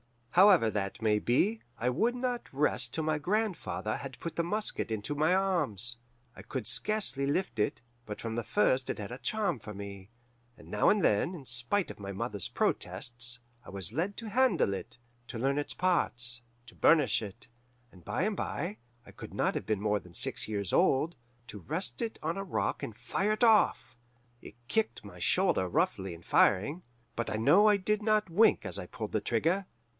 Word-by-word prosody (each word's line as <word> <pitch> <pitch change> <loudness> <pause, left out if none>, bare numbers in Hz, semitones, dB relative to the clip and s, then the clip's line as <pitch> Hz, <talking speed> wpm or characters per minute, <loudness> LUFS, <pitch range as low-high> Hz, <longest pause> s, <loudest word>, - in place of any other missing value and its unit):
"However 180 - +6
that 100 -2 -3
may 105 -1 +3
be, 195 - +1 0.2
I 125 - 0
would 230 - +1
not 245 -1 -3
rest 130 -4 +1
till 160 - -2
my 155 -1 0
grandfather 190 - -1
had 135 -2 -8
put 170 - -5
the 170 - +1
musket 210 - -1
into 110 +5 -3
my 155 +5 +2
arms. 140 - +1 0.4
I - - -10
could 130 -6 -5
scarcely 140 - 0
lift 140 - -1
it, 105 - 0 0.2
but 105 -2 -6
from 115 -1 -4
the 120 +1 -2
first 130 +5 +2
it - - -2
had 105 +1 -6
a 125 - -6
charm 205 - 0
for 105 0 -8
me, 100 -1 -8 0.5
and - - -15
now - - +3
and 205 -2 +3
then, 105 - +2
in 145 -6 -10
spite 125 +12 0
of - - -12
my 100 -1 -6
mother's 105 -2 -3
protests, 120 0 -2 0.2
I - - -12
was 95 -2 -2
let 175 - -1
to 230 -2 -5
handle 210 - +3
it, 95 - -7 0.3
to 120 - -6
learn 135 +4 +1
its 145 - -2
parts, 120 -10 +1 0.2
to 115 - -15
burnish 150 -7 +4
it, 110 +2 -8 0.4
and 90 -2 -17
by - - -1
and - - 0
bye 105 - -3 0.3
I - - -13
could - - -10
not - - +1
have - - -4
been 105 -2 0
more 105 0 +1
than 90 -2 -16
six 125 +5 0
years 100 -3 -2
old 165 -1 +3 0.3
to 110 -2 -8
rest 160 - -4
it 230 -1 -3
on 165 +4 -1
a 195 - -2
rock 190 - -2
and 110 - -5
fire 190 - -1
it 215 - -1
off. 210 - +3 0.4
It - - -12
kicked 220 - 0
my 90 -4 -11
shoulder 90 +2 +2
roughly 100 - 0
in 85 - -15
firing, 145 - +3 0.3
but 115 - -1
I - - -2
know 180 - +5
I 210 -1 +5
did 210 +2 0
not 215 -3 +1
wink 215 +6 +4
as - - -2
I - - -6
pulled 115 -4 -6
the 110 - 0
trigger. 170 - 0
130 Hz, 200 wpm, -30 LUFS, -, 0.5 s, However